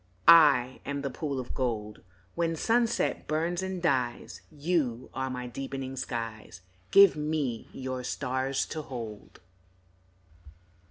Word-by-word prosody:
I 140 -6 +7
am 140 0 -4
the 140 - -2
pool 140 0 -3
of 125 - -6
gold 110 -5 -3 0.3
When 165 -1 0
sunset 235 +6 +1
burns 165 +4 0
and 190 -2 -4
dies, 125 -7 -1
You 145 -6 -1
are 130 0 -2
my 125 -1 -4
deepening 135 +1 -5
skies, 115 -7 -5 0.3
Give 200 -2 +7
me 150 -6 -2
your 130 -1 -5
stars 130 +1 -1
to 155 - -3
hold. 115 -10 -8
135 Hz, 120 wpm, -29 LUFS, 125-155 Hz, 0.3 s, I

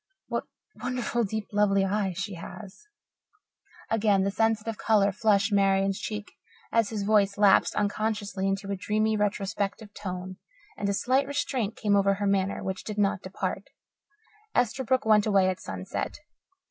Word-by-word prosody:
What - - -2 0.4
wonderful, 245 -1 -1
deep, 215 +1 -4
lovely 200 -1 +3
eyes 195 -2 -1
she 200 +1 -3
has." 190 - -10 1.1
Again 205 -3 +3
the 200 - 0
sensitive 225 +1 0
colour 205 -3 +3
flushed 205 0 +2
Marian's 195 -1 +2
cheek 210 -1 -5 0.4
as 230 -3 +2
his 215 -3 -3
voice 205 -1 +3
lapsed 205 -1 +4
unconsciously 205 -2 -1
into 195 0 -2
a - - 0
dreamy, 215 +3 0
retrospective 205 0 -2
tone, 185 -2 -6 0.4
and 200 -1 -2
a - - +1
slight 260 +7 +1
restraint 260 -6 -1
came 205 -2 +1
over 195 0 +3
her 205 +1 -2
manner, 195 -1 0
which 190 0 -4
did 215 -1 -6
not 200 -1 +1
depart. 185 +1 -4 0.9
Esterbrook 255 +1 +1
went 215 -1 +4
away 195 -3 +4
at 185 -1 -3
sunset. 95 - -5
205 Hz, 145 wpm, -27 LUFS, 195-220 Hz, 1.1 s, lapsed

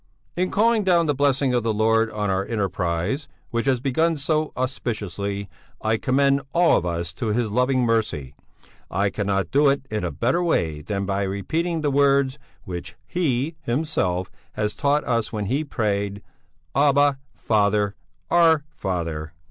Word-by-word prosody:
In 185 +1 0
calling 225 +1 +3
down 175 -3 +3
the 145 - +2
blessing 140 -1 +2
of 120 - +2
the 115 0 0
Lord 110 +1 +3
on 105 -2 -2
our 95 0 +1
enterprise, 100 - -2 0.2
which 115 +3 -1
has 130 -2 +3
begun 160 +6 +1
so 155 +2 0
auspiciously, 100 -5 -3 0.3
I 110 +1 +1
commend 140 +3 +2
all 175 0 +5
of 90 - -2
us 85 0 -3
to 110 - -4
His 110 0 0
loving 125 +3 +2
mercy; 110 - 0 0.6
I 100 +2 0
cannot 100 -2 -1
do 145 +1 +5
it 140 -1 0
in 105 -2 -2
a 90 - 0
better 130 +9 0
way 80 - 0
than 100 +5 -3
by 100 0 -1
repeating 155 - -1
the 145 -2 +1
words 140 0 +3 0.2
which 85 -1 -6
He 150 -3 0
Himself 120 - -1 0.2
has 105 -1 -1
taught 145 0 +1
us 115 -2 0
when 105 -2 -3
He 135 +9 0
prayed: 100 -6 -2 0.5
'Abba, 140 0 +3 0.2
Father 105 -2 +1 0.4
Our 165 -3 +5
Father....'" 85 -4 -3
115 Hz, 155 wpm, -23 LUFS, 100-145 Hz, 0.6 s, all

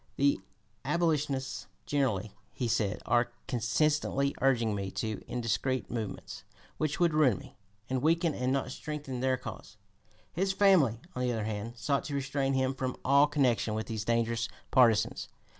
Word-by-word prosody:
"The 140 -7 +2 0.4
abolitionists 150 -3 0 0.2
generally," 110 -8 0 0.2
he 125 - -2
said, 105 -3 0
"are 120 0 +2 0.2
constantly 140 +3 +1
urging 120 -5 +3
me 100 -1 -3
to 110 +1 -4
indiscreet 125 +1 -1
movements, 110 -4 -5 0.4
which 155 +3 -1
would 170 -2 +3
ruin 140 -9 +4
me, - - -13 0.3
and 130 -1 -1
weaken 165 +1 +2
and 125 0 -1
not 135 0 0
strengthen 145 -4 -5
their 130 0 +1
cause." 130 - -9 0.6
His 190 +3 0
family, 175 - +4
on 125 - -2
the 125 -1 +1
other 110 -2 -2
hand, 110 +2 -4
sought 135 +6 0
to 145 - -3
restrain 135 0 0
him 130 0 +1
from 130 -1 -3
all 140 +2 +6
connection 125 -7 +1
with 110 - -2
these 110 -2 -3
dangerous 115 0 0 0.2
partisans. 115 -6 +4
130 Hz, 155 wpm, -30 LUFS, 115-145 Hz, 0.6 s, all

